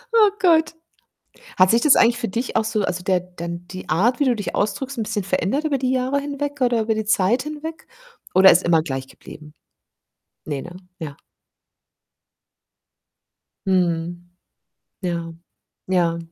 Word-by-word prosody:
Oh 430 -2 +7
Gott. 330 -3 +3 0.8
Hat 185 +2 +6
sich 230 +1 +3
das 300 - +6
eigentlich 235 +1 +4
für 230 - -2
dich 235 +6 -4
auch - - +3
so 215 -2 -1
also, 180 -1 -2
der 185 -1 +2
dann 175 -1 -8
die 185 -4 -9
Art, 225 - +2
wie 285 - +2
du 245 -2 +2
dich 205 - -5
ausdrückst, 265 +5 -2
'n - - 0
bisschen 205 -1 -3
verändert 200 - -1
über 285 -3 +1
die 260 -1 0
Jahre 260 +2 0
hinweg 285 0 -5
oder 240 -2 +2
über 220 0 0
die 220 -1 -3
Zeit 220 +5 +2
hinweg? 305 +2 -7 0.5
Oder 190 +1 +8
ist 170 - +3
immer 165 -2 +3
gleich 135 -3 -4
geblieben? 150 0 -13 0.9
Ne, 145 -3 -3
ne? 175 +1 -10 0.2
Ja. 150 -3 -7 2.5
Mhm. 175 -2 0 0.8
Ja, 170 -2 -3 0.5
ja. 175 -3 +1
205 Hz, 155 wpm, -22 LUFS, 175-260 Hz, 2.5 s, Oder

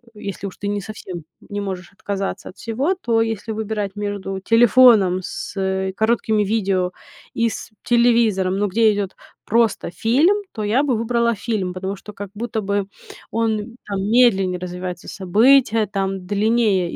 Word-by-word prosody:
если 200 -1 -6
уж 190 - -10
ты 200 - -5
не 205 0 -1
совсем 185 -5 -8 0.2
не 205 -1 -4
можешь 190 -3 -5
отказаться 195 0 -4
от - - -14
всего, 260 - -1
то 235 -10 +1
если 225 -1 -2
выбирать 210 -2 -3
между 205 -2 -4
телефоном 230 -3 +5
с, 195 - -6
э, 190 0 -1
короткими 220 -1 +1
видео 195 -3 0 0.4
и 230 0 +1
с 220 - -7
телевизором, 230 -6 +3
но 205 +1 +1
где 215 +2 +3
идет 200 -2 -3 0.3
просто 225 -5 +1
фильм, 310 - +2
то 215 - -4
я 220 +7 +2
бы 270 -4 +1
выбрала 235 0 +1
фильм, 200 -3 -2
потому 190 +2 -4
что, 210 +2 -11
как 205 0 -7
будто 225 +1 -3
бы, 200 -1 -1 0.4
он 225 0 -1
там 200 -2 -3
медленнее 195 -6 +4
развивается 180 0 -6
события, 225 +4 +3
там 195 -2 -3
длиннее 205 -2 +1
205 Hz, 155 wpm, -21 LUFS, 190-230 Hz, 0.4 s, телефоном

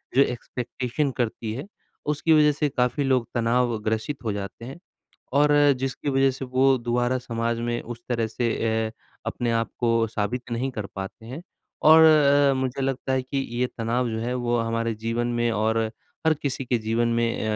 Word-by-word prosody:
जो 135 - +6
एक्सपेक्टेशन 125 +2 -2
करती 115 -2 -2
है, 135 +9 -6 0.4
उसकी 155 +2 +2
वज़ह 150 -1 +6
से 145 0 -1
काफ़ी 125 +2 0
लोग 130 -3 +1
तनाव 120 0 +1
ग्रसित 110 +6 -2
हो 110 - -1
जाते 100 +3 -6
हैं। 135 +6 -9 0.6
और 150 0 +4 0.3
जिसकी 135 +2 -2
वज़ह 135 0 +3
से 130 +1 -6
वो 130 +1 +3
दोबारा 120 +2 0
समाज 115 -1 -2
में 120 0 -1
उस 120 0 -8
तरह 115 -2 0
से 115 +2 -1 0.4
अ, - - -11 0.3
अपने 120 -1 -1
आप - - -7
को 115 -1 +2
साबित 115 +4 -3
नहीं 125 +3 -1
कर 105 -4 -4
पाते 95 +3 -7
हैं। 130 +8 -7 0.4
और 160 +1 +8
अ, 145 -3 +5
मुझे 130 0 -2
लगता 135 0 -1
है 130 - +1
कि 130 +2 -3 0.2
ये 125 - +3
तनाव 120 +2 0
जो 110 - -3
है 120 +2 -2
वो 120 -1 0
हमारे 115 0 -1
जीवन 120 +1 0
में 120 - +2
और 110 +1 +1 0.5
हर 160 - +5
किसी 135 -1 -2
के 125 -1 0
जीवन 115 +2 0
में 115 -1 0
125 Hz, 185 wpm, -25 LUFS, 115-135 Hz, 0.6 s, और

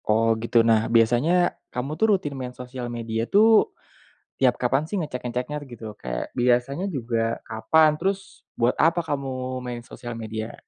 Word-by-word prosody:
Oh, 115 +1 +4
gitu. 115 0 +3
Nah 110 -1 +3
biasanya, 125 +11 +3 0.2
kamu 130 +3 -3
tuh 220 - +4
rutin 145 -6 -6
main 130 -2 -6
sosial 125 -1 -6
media 115 -1 -3
tuh, 220 +2 +5 0.7
tiap 130 -2 +3
kapan 135 +4 +1
sih 165 - -5
ngecek-ngeceknya 125 0 -4
gitu? 110 -4 -9
Kayak, - - -4
biasanya 125 +7 +1
juga 115 -2 -1
kapan? 155 +8 +4
Terus, 195 +3 -3
buat 120 +1 +3
apa 165 +2 +3
kamu 130 -4 -3
main 120 -1 -5
sosial 120 0 -8
media? 110 -1 -5
125 Hz, 150 wpm, -24 LUFS, 115-145 Hz, 0.7 s, tuh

